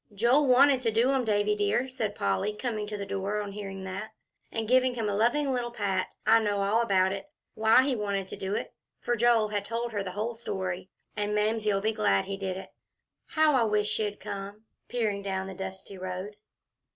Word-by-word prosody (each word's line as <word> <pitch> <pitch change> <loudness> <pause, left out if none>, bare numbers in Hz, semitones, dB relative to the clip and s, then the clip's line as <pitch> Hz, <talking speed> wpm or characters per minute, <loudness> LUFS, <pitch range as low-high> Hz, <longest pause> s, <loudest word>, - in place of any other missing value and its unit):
"Joel 245 +7 +4
wanted 260 +1 +6
to 230 -3 +1
do 235 +5 +3
'em, 265 -2 +2
Davie 210 -1 +2
dear," 210 +5 +1
said 230 -6 -3
Polly, 100 - 0
coming 215 -3 -3
to 210 0 -4
the 200 - -4
door, 200 +2 -2
on 205 -1 -4
hearing 195 -1 -6
that, 200 +4 -6 0.4
and 225 -1 -3
giving 255 +1 +4
him 225 -3 -1
a 205 - 0
loving 270 +7 +2
little 245 -1 -1
pat. 200 -5 -1 0.2
"I 225 +2 +6
know 205 -2 0
all 210 +4 +3
about 190 -4 +3
it, 195 +8 -6 0.2
why 220 +4 +5
he 265 -1 +1
wanted 200 -3 -2
to - - -5
do 195 +1 -3
it" - - -4 0.3
for 240 - 0
Joel 230 -2 +3
had 205 -1 -1
told 230 +3 -3
her 205 -2 -2
the 185 -2 -5
whole 220 +4 -2
story 185 -5 -4 0.3
"and 210 0 -1
Mamsie'll 210 -1 +1
be 220 +2 +1
glad 100 - +2
he 195 - -3
did 190 -1 -3
it. 190 - -9 0.6
How 310 -1 +3
I 255 -3 +4
wish 210 -1 +1
she'd 210 -2 -1
come!" 200 +2 -7 0.2
peering 215 -5 -1
down 190 -1 -2
the 190 - -6
dusty 190 0 -7
road. 185 +3 -5
210 Hz, 210 wpm, -28 LUFS, 195-235 Hz, 0.6 s, wanted